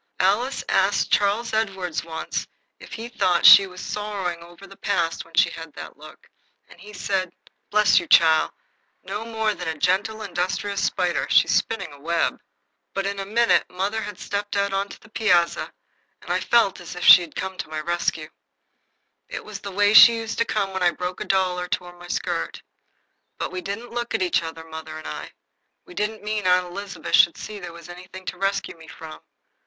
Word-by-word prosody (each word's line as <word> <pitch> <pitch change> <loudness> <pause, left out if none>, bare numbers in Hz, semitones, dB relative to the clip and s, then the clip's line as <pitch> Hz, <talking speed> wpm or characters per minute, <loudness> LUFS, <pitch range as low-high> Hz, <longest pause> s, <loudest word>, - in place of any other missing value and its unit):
Alice 210 +8 +1
asked 195 +1 +1
Charles 210 +3 +1
Edward 195 -6 -1
once 160 -1 -4 0.3
if - - -12
he 230 +1 -6
thought 185 -7 +1
she 195 -1 +10
was 185 0 -10
sorrowing 200 -5 -4
o'er 175 +3 -14
the 195 0 -14
past 170 -5 -1
when 165 0 -15
she 175 -1 +4
had 165 -2 -9
that - - -9
look, - - -15 0.4
and 175 - -17
he 210 +2 -11
said: 190 -2 -2 0.4
"Bless 210 -1 +4
you, 170 - -7
chile, 160 -1 +5 0.5
no 210 - -5
more 220 -2 -1
than 180 -3 -7
a 160 -1 -3
gentle 200 +7 0
industrious 195 +2 -2
spider. 180 -2 0
She's - - +4
spinning 225 -9 -1
a 145 - -14
web." 170 +3 -1 0.5
But 195 - -1
in 200 0 -3
a 195 - -5
minute 235 +3 +2
mother 200 +4 -2
had 205 -3 -7
stepped 205 0 -4
out 200 0 0
on 195 +1 0
the 220 - -14
piazza, 205 -6 +1 0.5
and - - -6
I - - +1
felt 230 -5 +2
as 175 - -9
if 180 - -6
she - - +10
had 170 -3 -9
come 190 +1 -4
to - - -5
my 155 0 -4
rescue. 160 -1 -2 1.0
It - - -6
was 210 -2 -7
the 200 - -7
way 205 +2 +3
she 235 +1 +10
used 225 -1 -4
to 230 - +3
come 200 -4 -1
when 190 - -3
I 175 - +5
broke 180 +1 -5
my - - -5
doll 185 -2 +1
or 180 - -4
tore 175 0 -4
my 175 0 -13
skirt. - - -3 0.7
But - - -4
we 185 0 -5
didn't 200 +6 -6
look 240 0 -3
at - - +1
each 180 - +1
other, 160 0 -7
mother 160 -1 -8
and 155 - -10
I. - - -7 0.5
We 355 - -13
didn't 215 -5 -3
mean 210 -2 -2
Aunt 180 0 +4
Elizabeth 195 +3 -7
should 170 - +5
see 210 -1 -7
there 175 -3 -8
was 170 0 -12
anything 180 +1 -11
to - - -6
rescue 195 -1 -1
me 160 -1 -15
from. 160 -1 -10
190 Hz, 200 wpm, -23 LUFS, 175-210 Hz, 1.0 s, she